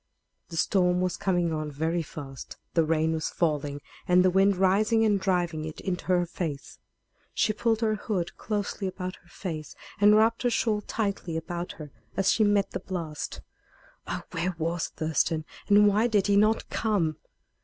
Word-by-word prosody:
The 165 - -6
storm 180 0 +2
was 180 -1 0
coming 175 -3 0
on 155 -1 -2
very 160 +4 -1
fast. 140 -3 -9 0.2
The 165 - +4
rain 160 0 +1
was 160 -1 -2
falling 145 -3 -1 0.3
and 180 +1 +5
the 185 - +4
wind 195 +2 +4
rising 215 +5 +3
and 205 -2 +3
driving 175 -5 0
it 155 0 -7
into 180 -2 -3
her 180 -1 +2
face. 160 -5 -5 0.6
She 215 - +2
pulled 225 +1 0
her 220 -1 +2
hood 200 -4 -3
closely 205 -2 -3
about 185 0 -5
her - - -25
face, 160 -5 -6 0.2
and 205 +1 +7
wrapped 225 +2 +3
her 245 - +2
shawl 220 -2 +1
tightly 200 -6 -2
about 175 +2 -4
her 150 -3 -10 0.3
as 195 0 +3
she 220 - +3
met 205 -1 +2
the - - -3
blast. 165 -5 -5 0.7
Oh! - - -3
where 180 +1 -2
was 165 +1 -1
Thurston, 155 0 -1 0.2
and 205 0 +6
why 210 +3 +3
did 210 -4 +2
he 205 - +3
not 215 +2 +3
come? 190 -9 0
180 Hz, 175 wpm, -27 LUFS, 160-205 Hz, 0.7 s, and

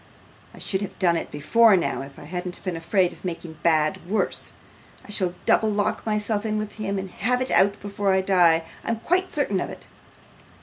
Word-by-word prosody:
I - - -16
should 190 -1 -2
have 200 - -6
done 175 -3 +3
it 165 - -3
before 210 +8 +4
now, 170 - -1
if 135 0 -10
I - - -10
hadn't 180 +3 -5
been 185 -3 -2
afraid 175 +2 +1
of - - -17
making 170 -3 -6
bad 155 -2 +2
worse. 215 - -1 0.5
I - - -10
shall 185 -4 0
double 220 - +4
lock 205 -1 0
myself 210 0 0
in 215 -1 -1
with 215 0 -5
him 200 -2 -2
and 190 -1 -5
have 250 +8 0
it 255 - -2
out 200 +1 +4
before 200 -1 -1
I 190 0 +3
die, 175 -4 +4 0.2
I'm 230 - 0
quite 370 +2 +1
certain 235 -10 0
of - - -3
it. - - -10
195 Hz, 205 wpm, -24 LUFS, 175-215 Hz, 0.5 s, before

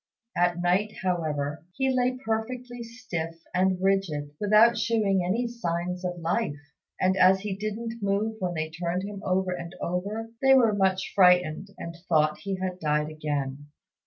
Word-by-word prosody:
At 175 0 +2
night, 185 +5 +1
however, 155 -4 -1
he 265 +3 +1
lay 250 0 +1
perfectly 245 +2 -3
stiff 220 -8 -5 0.2
and 185 0 +2
rigid, 185 -7 0
without 215 +3 +5
shewing 210 -5 +1
any 215 +8 0
signs 180 -6 -3
of 180 -1 -2
life; 170 -1 -1 0.4
and, 185 0 +3
as 190 0 +5
he 200 -1 -3
didn't 220 +3 -4
move 205 +2 0
when 180 -2 -2
they 155 0 -2
turned 175 +3 -2
him 200 0 -6
over 185 0 +1
and 170 -1 -5
over, 205 +6 -3
they 270 0 +6
were 235 -5 +5
much 190 -2 +1
frightened, 180 -2 +4
and 170 0 -7
thought 155 -2 +3
he 195 -1 -3
had 185 -1 -4
died 150 -1 0
again. 145 -2 -3
185 Hz, 160 wpm, -27 LUFS, 170-215 Hz, 0.4 s, they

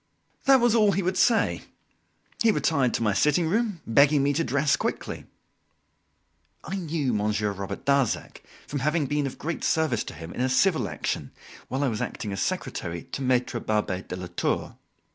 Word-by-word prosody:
That 270 -1 +7
was 240 -2 +3
all 210 -3 +4
he 195 - 0
would 185 +2 0
say. 230 +2 +3 0.8
He 230 - +5
retired 140 - +2
to - - -1
my 105 -2 +2
sitting 150 - +2
room, 210 -1 0
begging 140 +4 +4
me 145 +1 +2
to 165 - +1
dress 140 +2 +2
quickly. - - -4 1.4
I 190 - -4
knew 160 -8 -1
Monsieur 105 0 0
Robert 100 0 -6
Darzac 140 -4 0 0.2
from 145 - -4
having 150 +3 +1
been 145 0 0
of 130 - -7
great 165 +2 -4
service 155 -8 +1
to - - -8
him 80 +2 -8
in - - -4
a 130 - +1
civil 130 - +2
action, 75 - -3 0.4
while 135 +2 -2
I - - +2
was 110 -4 -2
acting 105 - -4
as 100 - -3
secretary 105 - -3
to - - -4
Maitre 125 -2 +1
Barbet 105 -3 -1
Delatour. 90 -1 -2
140 Hz, 175 wpm, -26 LUFS, 105-165 Hz, 1.4 s, That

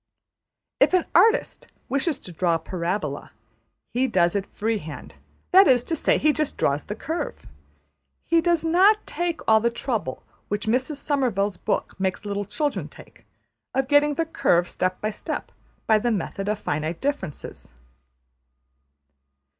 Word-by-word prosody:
If - - +5
an 365 - +2
artist 430 +7 +3 0.2
wishes 280 +2 0
to 180 - -10
draw 170 0 +1
a - - -1
parabola, 170 -3 -3 0.6
he 255 +2 +2
does 175 -5 +2
it 195 -1 -1
freehand, 205 -9 -4 0.4
that 385 +2 +8
is 245 -2 +4
to 325 - -2
say, - - +2
he 305 0 +3
just 305 -1 -2
draws 140 +1 +1
the 210 - -5
curve 320 +9 -4 0.8
He 335 0 +3
does 340 -1 +2
not 380 +6 +4
take 345 -1 -3
all 220 0 +6
the 235 +2 +2
trouble 230 - -3 0.2
which 205 0 -3
Mrs 255 +6 0
Somervell's 235 - 0
book - - -2
makes 190 +2 -2
little 205 0 -2
children 295 +7 -2
take, - - -17 0.5
of 265 0 +1
getting 290 +1 +4
the 330 - 0
curve 175 - +2
step 185 0 -2
by 215 - -1
step - - -5 0.3
by 220 -1 +4
the 240 - 0
method 195 -1 -2
of 210 - 0
Finite 155 -2 -3
Differences. 270 - -4
225 Hz, 150 wpm, -24 LUFS, 190-300 Hz, 0.8 s, that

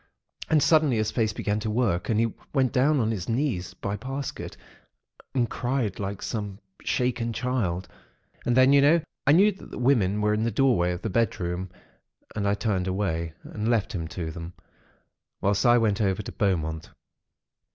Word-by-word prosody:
And 155 -2 +4
suddenly, 155 -7 +4
his 110 0 0
face 110 -3 +1
began 105 0 -1
to 110 - -3
work, 105 -6 0
and 110 -2 +2
he 115 -1 +1 0.2
went 130 -3 +3
down 140 +3 +3
on 110 -2 +1
to - - 0
his 95 -2 -5
knees 115 - -1
by 100 +2 -3
Parsket 135 +4 -5 0.8
and 120 -3 +2
cried 120 -6 -2
like 100 -1 -4
some 105 -4 -4 0.2
shaken 120 -2 -1
child. 110 -8 -1 0.6
And 120 0 +1
then, 130 +2 +6
you 140 - +6
know, 160 +4 +5 0.3
I - - +7
knew 200 +6 +6
that 195 - -13
the - - -8
women 110 -6 +2
were 105 0 +2
in 105 - 0
the 115 - +1
doorway 115 -10 +2
of 90 - -5
the 110 - -2
bedroom 95 -4 -1 0.7
and 100 -1 -1
I 100 - +2
turned 100 -4 -1
away 85 -4 -1
and 110 +2 -3
left 115 -1 +1
him 85 -4 -3
to 80 0 -5
them, 85 +1 -8 0.9
whilst 100 +3 +2
I 120 0 +6
went 110 -3 +1
over 95 0 0
to - - -7
Beaumont. 80 -5 -1
110 Hz, 185 wpm, -26 LUFS, 95-125 Hz, 0.9 s, I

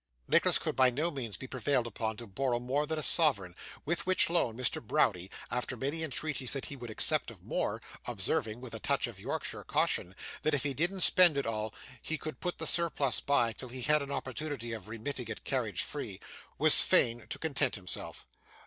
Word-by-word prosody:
Nicholas - - +5
could - - -3
by 130 -1 +5
no 150 +7 -1
means 120 -8 -5
be - - -8
prevailed 130 0 0
upon 110 -1 -3
to 120 - -7
borrow 120 +4 -1
more 135 +5 -1
than 160 +1 -2
a 155 - -2
sovereign, 100 - +3 0.3
with 160 0 -1
which 185 -2 +4
loan 120 -10 +1
Mr. 130 - 0
Browdie, 105 - +1 0.2
after 125 0 -2
many 140 +7 -1
entreaties 150 -3 -2
that 135 - -3
he 140 - -7
would 120 -3 -8
accept 110 - +3
of - - -13
more - - -2 0.3
(observing, 115 +1 -2
with 125 -3 -9
a 110 - -5
touch - - +1
of - - -8
Yorkshire - - -4
caution, 90 +2 0 0.3
that 155 -1 +1
if 140 - -1
he 140 -2 -1
didn't 175 +6 0
spend 175 -6 +6
it 140 - 0
all, 110 -1 -2 0.3
he 160 - -3
could 155 0 -6
put 180 -1 -3
the 160 - -4
surplus 150 -6 +1
by, 120 -5 +2
till 130 +3 -6
he 125 0 -5
had 150 +2 +3
an 140 - -6
opportunity 130 -3 -4
of 110 -2 -7
remitting 115 +2 -4
it 110 - -7
carriage 120 -8 -1
free), - - -5 0.4
was - - +8
fain 120 0 +3
to - - -3
content 140 -4 +1
himself. 90 -3 -5
130 Hz, 205 wpm, -31 LUFS, 115-150 Hz, 0.4 s, was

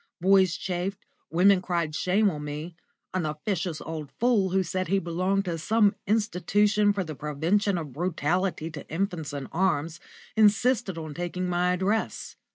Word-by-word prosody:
Boys 185 -2 +4
chaffed, 185 +1 -3 0.3
women 185 +3 +4
cried 170 -4 -1
shame 195 +6 +2
on 150 -2 -6
me; 150 +3 -6 0.4
an 185 -2 0
officious 160 +2 -2
old 155 -3 -6
fool, 225 -5 +3
who 190 +1 +2
said 185 +1 -2
he 195 +4 +2
belonged 185 +3 0
to 170 -2 -3
some 210 +4 +3
institution 210 0 +2
for 200 -1 -1
the 160 -3 -6
Prevention 165 +8 0
of 150 -6 -6
Brutality 170 +1 -1
to 150 -3 -9
Infants 170 -3 -2
in 140 -1 -5
Arms, 170 -2 0 0.4
insisted 215 -2 +3
on 155 -2 -6
taking 175 +2 -3
my 180 0 +1
address. 195 +5 -1
180 Hz, 155 wpm, -27 LUFS, 160-195 Hz, 0.4 s, Boys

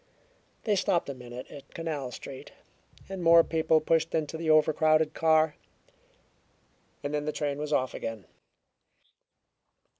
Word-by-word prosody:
They 210 -3 +2
stopped 185 -5 +1
a - - -3
minute 125 -1 -9
at 140 - -13
Canal 155 -6 -3
Street, 130 +1 -10 0.5
and 190 -1 -6
more 170 0 +7
people 160 -1 +2
pushed 165 +1 +1
into 155 0 -2
the 160 0 -3
overcrowded 155 0 +4
car, 160 -1 +3 1.5
and 145 +1 -3
then 150 0 -1
the 150 - -1
train 145 -2 -3
was 150 0 -4
off 130 -3 +1
again. 115 -3 -6
155 Hz, 130 wpm, -28 LUFS, 145-165 Hz, 1.5 s, more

